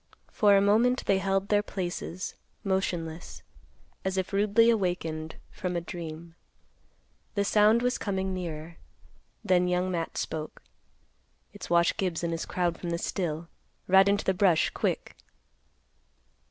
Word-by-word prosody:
For 205 Hz, -2 st, +5 dB
a -, -, +4 dB
moment 230 Hz, +5 st, +3 dB
they 195 Hz, -, +3 dB
held 195 Hz, 0 st, 0 dB
their 205 Hz, -1 st, +4 dB
places, 185 Hz, -2 st, -4 dB, 0.3 s
motionless, 175 Hz, -4 st, -3 dB, 0.6 s
as 190 Hz, 0 st, -2 dB
if 190 Hz, +1 st, -2 dB
rudely 210 Hz, +3 st, +4 dB
awakened 165 Hz, -6 st, -2 dB, 0.2 s
from 180 Hz, -1 st, -4 dB
a -, -, +1 dB
dream. 170 Hz, -1 st, -8 dB, 1.0 s
The 200 Hz, -1 st, +1 dB
sound 215 Hz, +3 st, +4 dB
was 250 Hz, 0 st, 0 dB
coming 190 Hz, -2 st, -2 dB
nearer. 165 Hz, -2 st, -6 dB, 0.7 s
Then 180 Hz, -3 st, +3 dB
Young 180 Hz, +1 st, 0 dB
Matt 165 Hz, -2 st, -3 dB
spoke, 155 Hz, -1 st, -4 dB, 0.9 s
"It's -, -, -9 dB
Wash 170 Hz, 0 st, +3 dB
Gibbs 180 Hz, -3 st, -1 dB
and 170 Hz, -, -1 dB
his 165 Hz, -, -4 dB
crowd 175 Hz, -2 st, -1 dB
from 175 Hz, -, -4 dB
the 170 Hz, -, -1 dB
still. 165 Hz, -2 st, -3 dB, 0.4 s
Ride 190 Hz, +1 st, +6 dB
into 200 Hz, 0 st, +1 dB
the 190 Hz, -, +3 dB
brush 180 Hz, -4 st, +3 dB
quick." -, -, -2 dB
185 Hz, 140 wpm, -28 LUFS, 170-200 Hz, 1.0 s, Ride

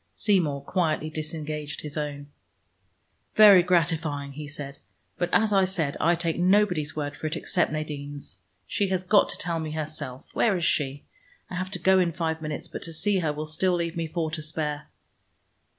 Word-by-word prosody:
Seymour 165 Hz, -10 st, +1 dB
quietly 155 Hz, -2 st, 0 dB
disengaged 155 Hz, -1 st, -5 dB
his 150 Hz, -2 st, -7 dB
own. 145 Hz, -2 st, -4 dB, 1.1 s
"Very 205 Hz, -4 st, +9 dB
gratifying," 160 Hz, -5 st, 0 dB
he 150 Hz, +2 st, -7 dB
said, 145 Hz, -1 st, -7 dB, 0.4 s
"but 175 Hz, -, 0 dB
as 215 Hz, -1 st, +3 dB
I 195 Hz, -1 st, +5 dB
said, 170 Hz, -6 st, 0 dB
I 170 Hz, +1 st, +3 dB
take 170 Hz, 0 st, -2 dB
nobody's 180 Hz, -5 st, +2 dB
word 145 Hz, -1 st, -3 dB
for 155 Hz, -, -4 dB
it, 155 Hz, -, -3 dB
except 175 Hz, 0 st, 0 dB
Nadine's. 145 Hz, -, -5 dB, 0.3 s
She 200 Hz, -, 0 dB
has 185 Hz, -1 st, -1 dB
got 205 Hz, +2 st, +4 dB
to -, -, +2 dB
tell 170 Hz, -2 st, -1 dB
me 155 Hz, -1 st, -4 dB
herself. 155 Hz, -4 st, -5 dB
Where 205 Hz, -5 st, +2 dB
is 170 Hz, -, -1 dB
she? 140 Hz, -1 st, 0 dB, 0.5 s
I -, -, -4 dB
have 185 Hz, +1 st, -3 dB
to 200 Hz, -, -2 dB
go 190 Hz, 0 st, +4 dB
in 175 Hz, -2 st, +1 dB
five 160 Hz, -1 st, -2 dB
minutes, 155 Hz, +2 st, -4 dB
but -, -, -7 dB
to 165 Hz, -, -4 dB
see 195 Hz, +4 st, +1 dB
her 160 Hz, -4 st, 0 dB
will 150 Hz, +1 st, -4 dB
still 175 Hz, +4 st, +1 dB
leave 170 Hz, 0 st, -2 dB
me 165 Hz, -1 st, -2 dB
four 160 Hz, -1 st, -2 dB
to 160 Hz, -1 st, -4 dB
spare." 150 Hz, -1 st, -3 dB
160 Hz, 185 wpm, -26 LUFS, 150-180 Hz, 1.1 s, Very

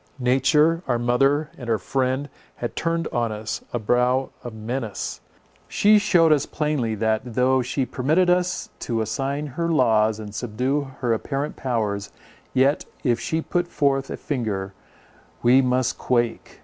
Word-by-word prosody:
Nature, 145 Hz, +6 st, +3 dB
our 120 Hz, -2 st, +2 dB
mother, 135 Hz, +5 st, +2 dB
and 120 Hz, -3 st, -6 dB
our 115 Hz, -, +3 dB
friend, 130 Hz, +6 st, -1 dB, 0.3 s
had 120 Hz, -, -5 dB
turned 165 Hz, 0 st, -1 dB
on 120 Hz, -2 st, -1 dB
us 110 Hz, 0 st, -5 dB
a -, -, -1 dB
brow 125 Hz, +4 st, +1 dB
of 120 Hz, -, -6 dB
menace. 110 Hz, +1 st, -4 dB, 0.5 s
She 210 Hz, +1 st, +5 dB
shewed 175 Hz, -6 st, +4 dB
us 150 Hz, -2 st, +3 dB
plainly, 150 Hz, -8 st, -1 dB
that, 110 Hz, 0 st, +1 dB
though 130 Hz, +2 st, +2 dB
she 125 Hz, +2 st, -1 dB
permitted 145 Hz, +9 st, +1 dB
us 180 Hz, +1 st, +1 dB
to 115 Hz, -1 st, -2 dB
assign 135 Hz, +6 st, -2 dB
her 165 Hz, +4 st, -3 dB
laws 110 Hz, -7 st, +3 dB
and 105 Hz, -2 st, -8 dB
subdue 130 Hz, +6 st, -1 dB
her 120 Hz, -3 st, +2 dB
apparent 140 Hz, +6 st, -3 dB
powers, 105 Hz, -6 st, -2 dB, 0.4 s
yet, 135 Hz, +3 st, +2 dB, 0.2 s
if 120 Hz, -4 st, +2 dB
she 160 Hz, 0 st, -2 dB
put 175 Hz, 0 st, -1 dB
forth 135 Hz, -4 st, +1 dB
but -, -, -4 dB
a -, -, -13 dB
finger, 105 Hz, -8 st, -3 dB, 0.7 s
we 125 Hz, +3 st, +6 dB
must 125 Hz, -1 st, 0 dB
quake. 120 Hz, -2 st, -1 dB
130 Hz, 155 wpm, -23 LUFS, 115-145 Hz, 0.7 s, we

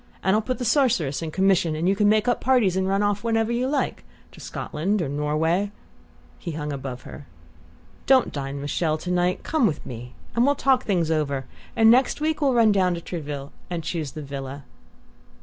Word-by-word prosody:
And 190 Hz, +1 st, +3 dB
I'll 215 Hz, -, +2 dB
put 255 Hz, +3 st, -3 dB
the 250 Hz, -, -3 dB
Sorceress 220 Hz, -, +2 dB
in 165 Hz, -, -3 dB
commission, 185 Hz, -2 st, +2 dB
and 165 Hz, +3 st, -1 dB
you 195 Hz, -, +3 dB
can 205 Hz, 0 st, +3 dB
make 215 Hz, +1 st, +3 dB
up 245 Hz, -, +1 dB
parties 240 Hz, -8 st, +3 dB
and 190 Hz, 0 st, 0 dB
run 195 Hz, +1 st, +1 dB
off 205 Hz, 0 st, 0 dB
whenever 225 Hz, 0 st, +1 dB
you 245 Hz, +2 st, 0 dB
like, 280 Hz, 0 st, -1 dB, 0.3 s
to -, -, -15 dB
Scotland 195 Hz, +8 st, -2 dB
or 165 Hz, -, -1 dB
Norway 155 Hz, +7 st, 0 dB, 0.3 s
" -, -, -29 dB
He 170 Hz, -, -5 dB
hung 150 Hz, -1 st, -4 dB
above 130 Hz, -2 st, -6 dB
her. 145 Hz, -, -11 dB, 0.8 s
"Don't 260 Hz, -2 st, +4 dB
dine 140 Hz, 0 st, -4 dB
with 145 Hz, -, -4 dB
Chelles 155 Hz, -2 st, 0 dB
to 180 Hz, -, -3 dB
night! 180 Hz, 0 st, +1 dB
Come 300 Hz, -7 st, +2 dB
with 155 Hz, -5 st, -4 dB
me, 125 Hz, 0 st, -8 dB, 0.2 s
and 235 Hz, -, +3 dB
we'll 285 Hz, +2 st, +3 dB
talk 265 Hz, -2 st, +2 dB
things 175 Hz, -6 st, +1 dB
over; 140 Hz, -4 st, -1 dB, 0.3 s
and 225 Hz, 0 st, +6 dB
next 255 Hz, +4 st, +3 dB
week 310 Hz, +1 st, -1 dB
we'll 270 Hz, -3 st, +3 dB
run 225 Hz, -2 st, +5 dB
down 185 Hz, -3 st, +2 dB
to -, -, -5 dB
Trouville 145 Hz, -5 st, -6 dB, 0.2 s
to 175 Hz, -1 st, -2 dB
choose 160 Hz, -3 st, -4 dB
the 155 Hz, -, -6 dB
villa." 140 Hz, 0 st, -6 dB
180 Hz, 210 wpm, -24 LUFS, 150-225 Hz, 0.8 s, and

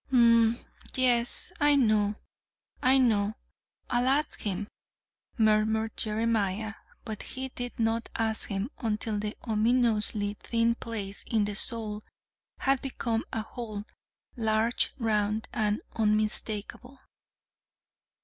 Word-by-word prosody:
"Hm 230 Hz, -2 st, +5 dB
m, -, -, -12 dB, 0.4 s
yes, 245 Hz, +3 st, +3 dB
I 290 Hz, -1 st, +5 dB
know, 215 Hz, -5 st, +3 dB, 0.7 s
I 260 Hz, +1 st, +6 dB
know. 220 Hz, -5 st, +2 dB, 0.5 s
I'll 245 Hz, +1 st, +1 dB
ask 285 Hz, +3 st, +1 dB
him," 205 Hz, 0 st, -2 dB, 0.7 s
murmured 220 Hz, 0 st, +2 dB
Jeremiah 220 Hz, -1 st, 0 dB, 0.3 s
but 220 Hz, -3 st, -5 dB
he 265 Hz, 0 st, -5 dB
did 245 Hz, -1 st, -5 dB
not 225 Hz, 0 st, 0 dB
ask 220 Hz, -1 st, 0 dB
him 200 Hz, +5 st, -2 dB
until 215 Hz, -2 st, -1 dB
the 210 Hz, +1 st, -4 dB
ominously 215 Hz, -2 st, +1 dB
thin 230 Hz, 0 st, +1 dB
place 210 Hz, -4 st, -5 dB
in 220 Hz, -3 st, +2 dB
the 205 Hz, -, -3 dB
sole 215 Hz, -1 st, 0 dB, 0.6 s
had 270 Hz, -1 st, +2 dB
become 235 Hz, -4 st, -2 dB
a 220 Hz, -, -2 dB
hole, 215 Hz, -3 st, -6 dB, 0.5 s
large, 225 Hz, 0 st, +1 dB
round, 215 Hz, -2 st, 0 dB
and 210 Hz, -1 st, 0 dB
unmistakable. 215 Hz, +3 st, -1 dB
220 Hz, 110 wpm, -28 LUFS, 210-240 Hz, 0.7 s, I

